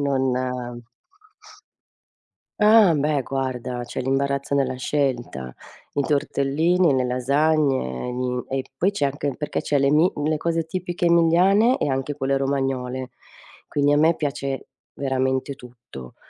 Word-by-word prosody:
non 135 -2 +1 2.3
Ah, 210 -5 +6
beh, 145 0 +1
guarda 125 -2 -3
c'è 120 - -5
l'imbarazzo 140 +1 -1
nella 135 -2 +1
scelta: 125 - -2 0.4
i 145 - +1
tortellini, 150 +4 +1
le 130 -1 +1
lasagne, 130 - 0
gli 125 0 -2
e 135 0 -2
poi 180 +8 +2
c'è 200 -8 -1
anche 140 -1 -2
perché 150 -1 -3
c'è 145 - 0
l'emi 150 +6 +3
le 150 +1 0
cose 165 +1 -1
tipiche 175 +1 -3
emiliane 180 +8 +4
e - - -1
anche 135 +1 -2
quelle 135 0 0
romagnole, 135 -2 -2 0.6
quindi 145 0 +2
a - - +3
me 160 +2 +4
piace 140 -3 -4 0.2
veramente 130 0 -1
tutto. 120 - -12
140 Hz, 125 wpm, -23 LUFS, 130-155 Hz, 2.3 s, Ah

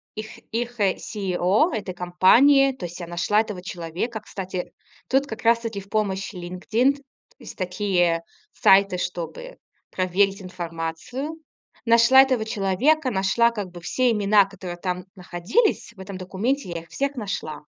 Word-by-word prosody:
их 215 0 -7 0.2
их, 240 0 -3
э, 195 -2 +2
CEO 195 - 0
этой 200 -4 -4
компании. 240 +11 +5
То 190 -9 -7
есть 175 +2 -8
я 170 - -6
нашла 175 +5 +1
этого 210 -5 -6
человека. 180 +5 -4
Кстати, 185 -4 -6 0.4
тут 270 +2 +2
как 220 -3 -7
раз-таки 230 -2 +2
в 200 - -17
помощь 200 -2 -1
LinkedIn. 220 +10 0 0.4
Есть 240 - -11
такие 180 -3 0 0.3
сайты, 195 -1 +4
чтобы 180 - -5 0.3
проверить 195 +2 +1
информацию. 175 - -5 0.5
Нашла 235 +3 +7
этого 255 -5 +1
человека, 245 +8 +1
нашла 215 +4 +2
как 205 -5 -5
бы 175 -1 -10
все 250 +7 +1
имена, 205 -1 +4
которые 185 -3 -8
там 180 0 -3
находились, 185 - 0
в - - -19
этом 190 0 -7
документе. 195 +6 -2
Я 170 -1 -4
их 165 - -19
всех 275 - -2
нашла. 195 - -5
195 Hz, 145 wpm, -24 LUFS, 180-235 Hz, 0.5 s, Нашла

